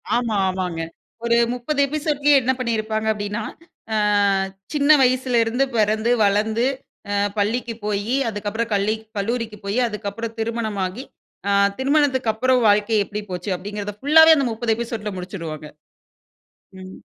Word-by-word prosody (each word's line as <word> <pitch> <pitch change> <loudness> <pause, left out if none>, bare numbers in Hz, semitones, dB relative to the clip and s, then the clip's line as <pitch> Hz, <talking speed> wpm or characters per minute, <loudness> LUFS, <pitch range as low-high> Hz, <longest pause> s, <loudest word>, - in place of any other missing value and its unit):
ஆமா. 235 -3 0
ஆமாங்க. 180 -3 -2 0.4
ஒரு 235 0 +3 0.2
30 250 +4 -3
எபிசோட்லயே 295 -1 +2
என்ன 255 +1 +1
பண்ணியிருப்பாங்க 220 -2 -1
அப்படின்னா 205 +1 -4 0.5
அ - - +2 0.8
சின்ன 290 -1 +1
வயசுலருந்து 250 -1 +2
பிறந்து 220 +1 +2
வளர்ந்து 215 +3 +1 0.5
அ 200 0 +1
பள்ளிக்கு 230 +3 -1
போயி 210 +4 -1
அதுக்கு 205 -1 -4
அப்புறம் 225 +2 -3
கள்ளி 205 +2 +1 0.2
கல்லூரிக்கு 225 +1 -2
போயி 200 +5 0
அதுக்கு 210 -1 -4
அப்புறம் 230 +2 -6
திருமணமாகி 220 -2 -3 0.5
அ - - +2 0.3
திருமணத்துக்கு 265 -4 +2
அப்புறம் 255 +3 +2
வாழ்க்கை 210 +2 +3
எப்படி 210 +2 -5
போச்சு 180 +2 -4
அப்படிங்கறத 205 +2 -6
புல்லாவே 320 +2 +7
அந்த 275 - +1
30 225 0 0
எபிசோட்ல 225 -2 -4
முடிச்சிடுவாங்க. 165 -5 -6 1.1
ம். 185 0 -10
220 Hz, 130 wpm, -21 LUFS, 205-245 Hz, 1.1 s, புல்லாவே